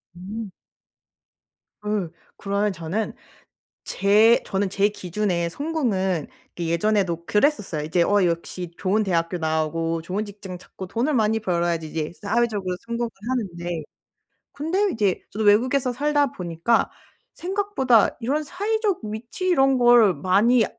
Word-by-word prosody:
음. 200 Hz, +3 st, -7 dB, 1.3 s
네. 210 Hz, -5 st, -1 dB, 0.3 s
그러면 200 Hz, +1 st, 0 dB
저는 170 Hz, +6 st, -3 dB, 0.7 s
제 215 Hz, +4 st, +4 dB
저는 195 Hz, 0 st, -1 dB
제 200 Hz, +2 st, +2 dB
기준에 185 Hz, -3 st, -2 dB
성공은 195 Hz, -, -1 dB, 0.3 s
그 175 Hz, -, -4 dB
예전에도 170 Hz, 0 st, 0 dB
그랬었어요. 210 Hz, -, +1 dB
이제 165 Hz, +3 st, +1 dB
어 205 Hz, 0 st, +3 dB
역시 170 Hz, +1 st, -3 dB
좋은 210 Hz, +3 st, +1 dB
대학교 170 Hz, -1 st, 0 dB
나오고 160 Hz, +1 st, -1 dB
좋은 190 Hz, +6 st, -3 dB
직장 200 Hz, -3 st, -9 dB
찾고 185 Hz, +1 st, -10 dB
돈을 240 Hz, +9 st, 0 dB
많이 220 Hz, -3 st, +2 dB
벌어야지 170 Hz, -5 st, -1 dB
이제 155 Hz, 0 st, -3 dB
사회적으로 205 Hz, -3 st, 0 dB
성공을 235 Hz, 0 st, -2 dB, 0.2 s
하는데 175 Hz, -9 st, -3 dB, 0.7 s
근데 360 Hz, +8 st, 0 dB
이제 205 Hz, -4 st, 0 dB
저도 220 Hz, +2 st, -3 dB
외국에서 250 Hz, +5 st, +3 dB
살다 290 Hz, +1 st, +1 dB
보니까 175 Hz, +6 st, 0 dB, 0.4 s
생각보다 360 Hz, -, +2 dB
이런 280 Hz, +7 st, 0 dB
사회적 410 Hz, +5 st, -1 dB
위치 225 Hz, -, -5 dB
이런 270 Hz, -6 st, +4 dB
걸 240 Hz, -5 st, +6 dB
많이 205 Hz, -, +3 dB
205 Hz, 285 characters per minute, -23 LUFS, 175-240 Hz, 1.3 s, 걸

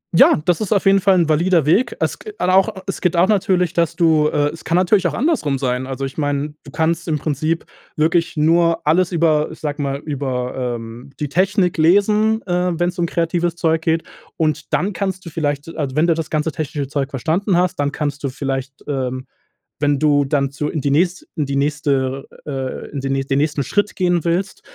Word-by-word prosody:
Ja, -, -, +6 dB
das 180 Hz, +2 st, +1 dB
ist 210 Hz, -, -3 dB
auf 200 Hz, -2 st, +2 dB
jeden 195 Hz, 0 st, +5 dB
Fall 195 Hz, 0 st, +4 dB
'n 170 Hz, -, +3 dB
valider 165 Hz, +1 st, +2 dB
Weg. 230 Hz, +11 st, +2 dB
Es -, -, -1 dB
g 430 Hz, -, -8 dB
al 185 Hz, -, +1 dB
auch 190 Hz, 0 st, +4 dB, 0.2 s
es 195 Hz, -, -4 dB
geht 180 Hz, -1 st, +1 dB
auch 180 Hz, -, +5 dB
natürlich, 185 Hz, -4 st, +1 dB
dass 170 Hz, -2 st, +1 dB
du 160 Hz, -3 st, +3 dB
äh, 145 Hz, -1 st, +1 dB
es 165 Hz, -, -11 dB
kann 170 Hz, -, 0 dB
natürlich 185 Hz, +2 st, +3 dB
auch -, -, -3 dB
andersrum 245 Hz, -, 0 dB
sein. 130 Hz, 0 st, -2 dB
Also 135 Hz, +1 st, -4 dB
ich 135 Hz, -, -6 dB
meine, 145 Hz, 0 st, -1 dB
du -, -, -12 dB
kannst 165 Hz, +1 st, 0 dB
im 155 Hz, -2 st, +1 dB
Prinzip 155 Hz, +3 st, -2 dB, 0.3 s
wirklich 165 Hz, +1 st, +1 dB
nur 165 Hz, +2 st, +2 dB
alles 175 Hz, +4 st, +3 dB
über 155 Hz, -3 st, +2 dB
ich -, -, -11 dB
sage 150 Hz, -1 st, -3 dB
mal, 140 Hz, 0 st, -1 dB
über, 130 Hz, -4 st, -3 dB, 0.2 s
ähm, 115 Hz, +3 st, -9 dB
die 150 Hz, -2 st, -2 dB
Technik 185 Hz, +1 st, +1 dB
lesen, 210 Hz, +6 st, +3 dB
äh, 180 Hz, -2 st, 0 dB
wenn's 175 Hz, 0 st, -1 dB
um 170 Hz, -, +1 dB
kreatives 170 Hz, 0 st, -1 dB
Zeug 160 Hz, -1 st, +1 dB
geht 165 Hz, 0 st, 0 dB, 0.3 s
und 155 Hz, -1 st, -1 dB
dann 200 Hz, +2 st, 0 dB
kannst 185 Hz, 0 st, -3 dB
du 170 Hz, -, -7 dB
vielleicht 145 Hz, 0 st, -3 dB
also, 140 Hz, -4 st, -3 dB
wenn 155 Hz, +2 st, +3 dB
du 170 Hz, -, +3 dB
das 160 Hz, -1 st, -4 dB
ganze 155 Hz, +1 st, -1 dB
technische 150 Hz, -3 st, -4 dB
Zeug 140 Hz, -1 st, -2 dB
verstanden 170 Hz, -, 0 dB
hast, 180 Hz, 0 st, +1 dB
dann 145 Hz, 0 st, 0 dB
kannst 145 Hz, -1 st, -3 dB
du 140 Hz, -, 0 dB
vielleicht, 135 Hz, 0 st, -4 dB
ähm, 130 Hz, -2 st, -3 dB, 0.5 s
wenn 145 Hz, -1 st, +2 dB
du 145 Hz, -2 st, +3 dB
dann 140 Hz, -1 st, 0 dB
zu 150 Hz, +1 st, -3 dB
in 155 Hz, -, -3 dB
die 140 Hz, -, 0 dB
nächste 175 Hz, +5 st, +1 dB
in 150 Hz, -4 st, -1 dB
die 140 Hz, -, -2 dB
nächste 140 Hz, -2 st, 0 dB, 0.2 s
äh, 150 Hz, -, -5 dB
äh, 135 Hz, -1 st, -4 dB
in 140 Hz, -, -4 dB
den 135 Hz, 0 st, -1 dB
nä 135 Hz, 0 st, 0 dB
den 135 Hz, 0 st, 0 dB
nächsten 150 Hz, -1 st, 0 dB
Schritt 205 Hz, -, 0 dB
gehen 175 Hz, -3 st, +1 dB
willst, 180 Hz, +3 st, -1 dB
155 Hz, 220 wpm, -19 LUFS, 140-175 Hz, 0.5 s, Ja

